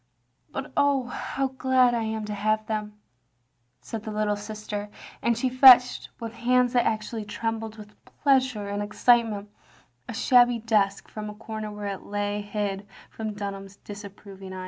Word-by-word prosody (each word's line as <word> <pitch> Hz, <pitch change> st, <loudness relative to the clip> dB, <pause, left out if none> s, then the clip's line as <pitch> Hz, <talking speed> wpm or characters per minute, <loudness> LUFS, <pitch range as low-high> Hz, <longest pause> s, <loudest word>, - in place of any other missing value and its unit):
But 270 Hz, -, -5 dB
oh, 285 Hz, -2 st, +3 dB
how 265 Hz, +2 st, -3 dB
glad 260 Hz, -1 st, +3 dB
I 235 Hz, -, 0 dB
am 220 Hz, -1 st, -3 dB
to 210 Hz, -, -4 dB
have 215 Hz, +1 st, 0 dB
them," 210 Hz, -1 st, -4 dB, 0.8 s
said 225 Hz, -, -6 dB
the 220 Hz, -, -7 dB
little 210 Hz, -1 st, 0 dB
sister, 210 Hz, 0 st, -6 dB, 0.3 s
and 235 Hz, -1 st, +1 dB
she 255 Hz, -, 0 dB
fetched, 255 Hz, -1 st, +7 dB
with 230 Hz, -2 st, -6 dB
hands 250 Hz, +1 st, +2 dB
that 245 Hz, -1 st, +3 dB
actually 220 Hz, 0 st, -2 dB
trembled 225 Hz, +1 st, -4 dB
with 210 Hz, -1 st, -12 dB, 0.3 s
pleasure 260 Hz, -7 st, +2 dB
and 205 Hz, 0 st, -3 dB
excitement, 210 Hz, -1 st, +2 dB, 0.6 s
a -, -, -4 dB
shabby 245 Hz, -2 st, +5 dB
desk 210 Hz, -3 st, +1 dB
from 210 Hz, -1 st, -6 dB
a 210 Hz, -, -8 dB
comer 215 Hz, 0 st, -6 dB
where 210 Hz, 0 st, -7 dB
it 200 Hz, -1 st, -4 dB
lay 205 Hz, 0 st, -2 dB
hid 205 Hz, -1 st, -3 dB, 0.2 s
from 220 Hz, -2 st, -5 dB
Dtmham's 200 Hz, -1 st, -6 dB
disapproving 200 Hz, -2 st, -10 dB
eye. 185 Hz, -, -6 dB
215 Hz, 160 wpm, -26 LUFS, 205-240 Hz, 0.8 s, fetched